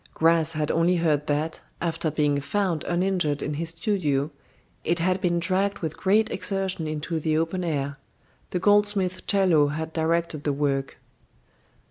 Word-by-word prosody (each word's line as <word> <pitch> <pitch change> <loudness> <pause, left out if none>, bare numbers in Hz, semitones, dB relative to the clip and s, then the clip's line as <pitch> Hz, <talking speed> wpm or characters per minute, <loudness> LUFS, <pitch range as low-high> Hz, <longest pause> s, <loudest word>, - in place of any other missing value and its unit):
Gras 165 0 +3
had 155 -1 -1
only 170 +2 +3
heard 155 -4 +1
that, 150 +2 -1 0.2
after 165 -1 -1
being 145 -1 +1
found 175 +2 -1
uninjured 175 -5 0
in 150 - -2
his 165 +3 -3
studio, 165 - 0 0.5
it 170 +2 +1
had 185 +2 0
been 175 -3 +1
dragged 195 +3 +1
with 160 -2 -4
great 215 +3 +2
exertion 190 -4 -1
into 155 +2 -3
the 155 0 0
open 165 +3 -1
air. 140 -4 -2 0.5
The - - -2
goldsmith 205 -1 +2
Chello 185 -8 +4
had 160 +1 -4
directed 165 -1 0
the 145 - 0
work. 140 -1 -1
165 Hz, 150 wpm, -25 LUFS, 150-185 Hz, 0.5 s, Chello